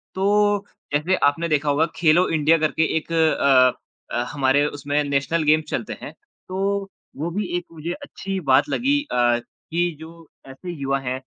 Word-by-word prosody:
तो 205 +1 +2 0.3
जैसे 165 +6 +2
आपने 165 +4 0
देखा 150 -1 +1
होगा 150 +3 +3
खेलो 170 +2 +4
इंडिया 160 +1 +3
करके 155 +1 +1
एक 165 - -5
अ 140 -5 +2
अ, 120 - +1
हमारे 140 +1 +2
उसमें 145 0 -1
नेशनल 140 +3 0
गेम्स 155 +1 +3
चलते 115 - -3
हैं - - -7 0.4
तो 195 +1 -1 0.3
वो 160 +4 -2
भी 205 +2 -2
एक 175 - -6
मुझे 165 +2 -5
अच्छी 195 -8 -5
बात 135 +2 +4
लगी 285 +3 +1
अ, 120 -1 +2 0.3
कि 175 0 +1
जो 165 0 -13 0.2
ऐसे 155 +7 -8
युवा 135 0 0
हैं 130 0 -4
155 Hz, 165 wpm, -22 LUFS, 140-180 Hz, 0.4 s, खेलो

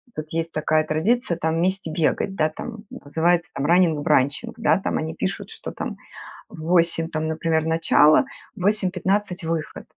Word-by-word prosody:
Тут 155 0 -6
есть 165 0 -2
такая 155 0 +1
традиция 170 +5 0
там 160 -1 -1
вместе 185 0 -1
бегать, 175 +4 0
да, 155 -2 +2
там 220 +7 -8
называется 165 +4 0
там 140 - -2
"Раннинг-бранчинг". 155 - +2
Да, 225 - +3
там - - -2
они 160 +1 -3
пишут, 190 - -3
что - - -7
там - - -5 0.5
в 190 -7 -12
8, 165 -1 +2
там, 155 -1 -2
например, 160 0 0
начало, 160 - +4 0.3
в 190 - -10
8:15 190 -1 0
выход. 160 -2 -4
165 Hz, 155 wpm, -23 LUFS, 155-185 Hz, 0.5 s, начало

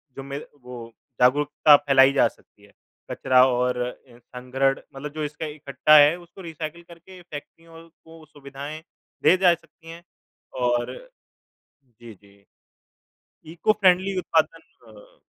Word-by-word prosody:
जो 135 - -8
मे 140 0 -6 0.3
वो 120 -2 -10 0.3
जागरूकता 145 +3 +4
फैलाई 135 -1 +4
जा - - +4
सकती - - -18
है। - - -20 0.4
कचरा 130 0 +3
और 125 0 0
अ, 125 0 -8 0.2
अनग्रढ़ 135 +2 -1 0.2
मतलब 145 +2 -8
जो 155 -1 -4
इसका 150 +2 -5
इकट्ठा 150 0 +2
है 145 +2 +6
उसको 175 +2 -15
रीसाइकल 165 0 -7
करके 175 +2 -16
फैक्ट्रियों 165 +1 -12
को 165 0 -19
वो 155 - -16
सुविधाएँ 145 +1 -10 0.4
दे 185 - +5
जा 180 -2 +4
सकती 165 0 -20
हैं 170 +1 -11 0.6
और 120 -1 0 1.1
जी, 120 -2 -12
जी। 100 0 -24 1.1
इको-फ़्रेंडली 190 0 +2
उत्पादन 165 -2 0 0.3
अ, 105 -2 -18
145 Hz, 135 wpm, -23 LUFS, 130-165 Hz, 1.1 s, है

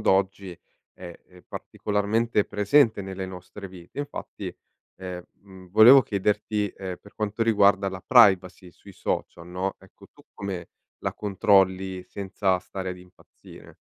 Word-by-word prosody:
d'oggi 95 -2 0 0.3
è, 85 -2 -10
ehm, 90 -1 -18
particolarmente 105 +1 -1
presente 105 +2 +3
nelle 95 -1 -5
nostre 95 +2 -9
vite. 90 +9 -9
Infatti, 145 - -7 0.4
ehm, 90 -1 -7 0.2
mhmm, 95 -2 -15
volevo 115 +7 +8
chiederti, 105 0 -1
ehm, 95 -1 -7
per 100 - -18
quanto 105 +1 -2
riguarda 100 -3 +4
la 95 -1 -7
privacy 95 -7 +4
sui 100 - -16
social, 85 -1 -4
no, 90 +2 -3
ecco, - - -18
tu - - -20
come 95 -4 -6 0.3
la - - -4
controlli 95 -2 +2
senza 95 -1 -1
stare 95 +1 -6
ad 90 - -6
impazzire? 90 0 -17
95 Hz, 135 wpm, -25 LUFS, 95-105 Hz, 0.4 s, volevo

